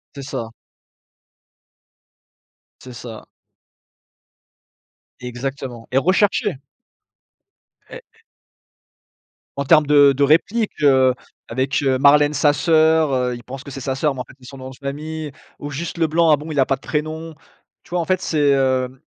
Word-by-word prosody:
C'est 140 - -7
ça. 115 -4 -5 2.3
C'est 125 -1 -10
ça. 115 -2 -9 2.0
Exactement 125 -1 -6
et 130 - +1
recherché! 190 +3 +1 1.3
Et 485 - -10 1.6
En 140 - -2
termes 155 +1 +5
de 145 -1 +5
de 140 +1 0
réplique, 200 +10 +2
heu, 130 -3 +4 0.4
avec, 130 +5 -1
heu, 135 -1 +2
Marlène 145 +2 +5
Sasseur, 155 +1 +3
heu, 125 -1 0
il 120 - -11
pense 135 +1 -9
que 140 - -10
c'est 135 -1 -7
sa 130 +1 -2
sœur 145 +1 0
mais 125 - -5
en - - -4
fait - - -17
c'est 125 - -17
son 135 - -11
nom 130 0 -8
de 130 - -12
famille 150 +2 -6 0.3
ou 145 - -6
Juste 165 +5 -5
Leblanc, 165 0 +2
ah 150 - +5
bon, 155 +2 -8
il 145 - -1
a 130 - +4
pas 135 - 0
de 135 - -31
prénom? 155 +2 -4 0.5
Tu - - -22
vois 175 - -1
en 170 - -1
fait 185 +1 0
c'est, 145 -5 +2
heu 130 -1 0
140 Hz, 155 wpm, -20 LUFS, 130-155 Hz, 2.3 s, termes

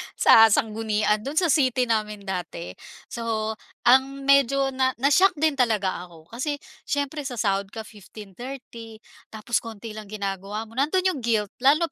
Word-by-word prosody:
sa 225 0 +7
sanggunian 215 0 +1
do'n 275 +8 -6
sa 340 -2 +3
city 255 -4 +2
namin 215 -3 -2
dati. 180 -3 -5 0.4
So 225 -2 -2 0.3
ang 265 +3 +3
medyo 275 0 +3
na 260 0 0
na-shock 320 +9 +3
din 300 -2 0
talaga 205 -6 0
ako 165 0 -18
kasi 285 +5 -2 0.3
siyempre 285 +1 -2
sasahod 200 -6 -1
ka 220 +2 -8
15, 210 -1 -13
30, 235 0 -9 0.3
tapos 220 +1 -2
konti 225 -1 -9
lang 215 -1 -9
ginagawa 200 0 -4
mo. 225 - -15
Nando'n 300 +10 0
'yong 370 -6 0
guilt 220 -4 0
lalo 290 +4 +3
230 Hz, 150 wpm, -24 LUFS, 210-275 Hz, 0.4 s, sa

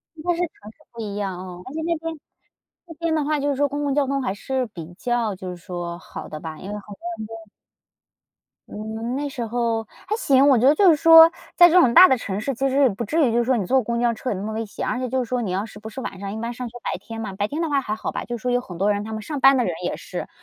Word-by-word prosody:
应 310 - -11
该 350 - +1
是 335 - -5
城 220 -11 -5
市 - - -38
不 230 - -8
一 205 -2 -5
样 195 -3 -3
哦， 180 -1 -8
而 260 - -9
且 320 - -3
那 335 +1 0
边 325 0 -6 0.7
那 330 - -9
边 330 +1 -1
的 310 -2 +1
话 300 0 0
就 285 - 0
是 280 - 0
说 285 +1 +2
公 290 +1 -3
共 285 -1 0
交 285 -1 +1
通 275 0 0
还 250 - -1
是 260 +5 -2
比 175 -5 -10
较 235 -2 -1
就 185 0 -7
是 180 - -5
说， 175 -1 -6
好 - - -9
的 155 - -7
吧， 160 0 -7
因 - - -11
为 - - -4
好 205 - -12
像 205 - -9 0.4
那 225 - -6
边 215 - -28 1.2
嗯， 220 +3 -5
那 290 +1 -2
时 250 -4 -4
候 230 -1 -1 0.2
还 420 - 0
行。 275 - +4
我 270 -3 +6
觉 245 +3 +4
得 290 - +6
就 385 +2 +6
是 325 - +6
说 325 +2 +8 0.2
在 350 - +9
这 360 +2 +6
种 250 -9 +4
大 370 - +10
的 260 - +3
城 200 -4 -4
市， 270 +6 -2
其 270 +3 0
实 270 +2 +2
也 265 - +6
不 215 +2 -4
至 300 +6 +2
于 - - +1
就 240 +1 +3
说 255 +1 +2
你 200 - -1
坐 265 +8 +3
公 235 +1 -2
交 240 -1 +2
车 250 +3 -5
有 - - -1
那 190 - -5
么 215 +1 -4
危 225 +1 -3
险， 205 - -5
而 250 - -1
且 255 -1 -3
就 255 0 0
说 245 +1 -1
你 215 - -3
要 190 +3 -1
是 215 -2 -12
不 220 - -8
是 220 - -8
晚 195 - -6
上， 200 0 -5
一 220 - -5
般 235 +1 -3
上 250 0 -6
学 240 - -11
白 - - -2
天 225 -1 -8
嘛， 205 -3 -5
白 205 +1 -1
天 300 +7 -3
的 330 - -1
话 280 -1 +2
还 215 -4 -3
好 220 - -4
吧。 - - -4
就 240 - -5
说 245 +2 -2
有 245 0 +2
很 180 -8 -10
多 200 +4 +2
人 205 0 -3
他 220 +1 -6
们 220 - -4
上 290 +5 -5
班 270 0 +6
的 250 - +2
人 - - -1
也 - - -2
是， - - -6
240 Hz, 340 characters per minute, -23 LUFS, 210-280 Hz, 1.2 s, 大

